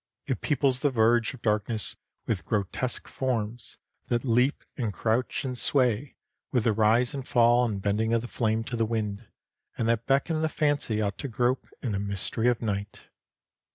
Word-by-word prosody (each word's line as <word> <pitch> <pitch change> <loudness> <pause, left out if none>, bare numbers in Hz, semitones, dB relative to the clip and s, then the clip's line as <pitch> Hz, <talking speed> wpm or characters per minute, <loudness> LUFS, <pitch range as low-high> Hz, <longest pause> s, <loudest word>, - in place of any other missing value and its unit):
It 130 - -2
peoples 135 -3 +2
the 145 - +2
verge 115 0 +2
of 120 - -18
darkness 105 0 +1 0.3
with 105 -5 -1
grotesque 110 +4 -2
forms, 120 -3 -2 0.3
that 120 +2 0
leap 125 +4 +2
and 115 -6 -2
crouch 115 +6 -1
and 130 -1 -2
sway 125 0 +1 0.4
with 125 -4 +2
the 115 - +3
rise 110 +3 +3
and 135 -2 -5
fall 120 0 +4
and 105 -4 -2
bending 105 +3 0
of 115 -1 +2
the - - -5
flame 110 -2 0
to 120 - -5
the 115 - +1
wind, 110 -1 -3 0.5
and 115 - 0
that 115 0 0
beckon 150 +4 +2
the 160 - +1
fancy 145 -9 0
out 100 -1 -3
to - - -3
grope 125 +1 0 0.2
in 120 - -1
the 100 - -1
mystery 100 +3 -1
of 120 -1 +1
night. 100 -2 -4
115 Hz, 180 wpm, -27 LUFS, 110-125 Hz, 0.5 s, fall